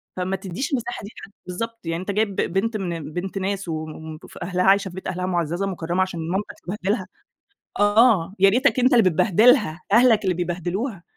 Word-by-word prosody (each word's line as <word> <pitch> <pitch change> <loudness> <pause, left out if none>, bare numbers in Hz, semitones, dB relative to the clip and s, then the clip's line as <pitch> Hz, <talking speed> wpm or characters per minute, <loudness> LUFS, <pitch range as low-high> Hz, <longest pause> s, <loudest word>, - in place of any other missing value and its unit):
فما 185 +1 -2
تدّيش 190 - -5
المساحة 240 -2 -2
دي 200 - -7
لحد 195 - -12 0.2
بالضبط. 230 +6 -5
يعني 165 +1 -2
أنت 190 - -3
جايب 205 -1 0
بنت 215 +5 0
من 165 -6 -5
بنت 190 +2 -4
ناس 195 -1 -2
و 165 - -2
ومف 155 0 -8
أهلها 180 +1 -1
عايشة 195 0 +4
في 175 - -12
بيت 190 - -7
أهلها 180 0 -3
مُعزَّزة 175 0 -1
مُكرَّمة 175 -1 -2
عشان 185 -2 -2
مامتك 195 +3 -3 0.2
تبهدلها؟ 190 0 -1 0.7
آه، 205 -3 +4
يا 195 +1 +6
ريتك 255 +5 +2
أنت 255 +2 +4
اللي 235 -3 +6
بتبهدلها، 210 - +3
أهلك 230 -2 +5
اللي 185 - +1
بيبهدلوها. 180 +4 -3
190 Hz, 185 wpm, -23 LUFS, 175-215 Hz, 0.7 s, يا